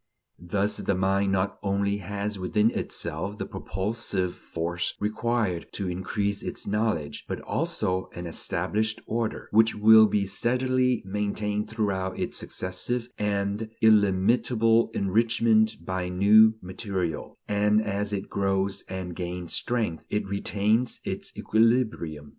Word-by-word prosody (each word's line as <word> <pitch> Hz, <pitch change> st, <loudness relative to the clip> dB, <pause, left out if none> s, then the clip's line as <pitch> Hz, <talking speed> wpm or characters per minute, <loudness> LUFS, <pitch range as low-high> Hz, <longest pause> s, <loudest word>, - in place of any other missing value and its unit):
Thus 100 Hz, +4 st, -1 dB
the 100 Hz, -, 0 dB
mind 95 Hz, +1 st, +1 dB
not 95 Hz, +1 st, 0 dB
only 100 Hz, 0 st, 0 dB
has 100 Hz, +1 st, -4 dB
within 105 Hz, +4 st, +2 dB
itself 100 Hz, -3 st, -3 dB
the -, -, -3 dB
propulsive 95 Hz, -2 st, -3 dB
force 85 Hz, +1 st, -3 dB
required 110 Hz, -4 st, -1 dB
to 100 Hz, -, -3 dB
increase 100 Hz, +3 st, -2 dB
its -, -, -5 dB
knowledge, 105 Hz, -8 st, -1 dB
but -, -, -3 dB
also 95 Hz, 0 st, -1 dB
an 85 Hz, -, -6 dB
established 100 Hz, +6 st, -1 dB
order, 115 Hz, -1 st, -2 dB
which 110 Hz, +1 st, +4 dB
will 110 Hz, +1 st, +7 dB
be 105 Hz, -1 st, +1 dB
steadily 125 Hz, +4 st, +1 dB
maintained 105 Hz, +1 st, -2 dB
throughout 100 Hz, -4 st, -2 dB
its -, -, -3 dB
successive 115 Hz, +7 st, -3 dB
and 105 Hz, +1 st, -1 dB
illimitable 110 Hz, +2 st, +4 dB
enrichment 110 Hz, +2 st, +3 dB
by 95 Hz, 0 st, -2 dB
new 105 Hz, +4 st, +6 dB
material; 95 Hz, -3 st, -4 dB
and 105 Hz, +1 st, +3 dB
as 105 Hz, -1 st, -2 dB
it 100 Hz, -1 st, -3 dB
grows 95 Hz, 0 st, -1 dB
and 95 Hz, -2 st, -5 dB
gains 90 Hz, -1 st, -4 dB
strength, 115 Hz, -9 st, -1 dB
it 105 Hz, 0 st, -1 dB
retains 105 Hz, +4 st, 0 dB
its -, -, -4 dB
"equilibrium." 110 Hz, -, +1 dB
100 Hz, 125 wpm, -26 LUFS, 95-110 Hz, -, will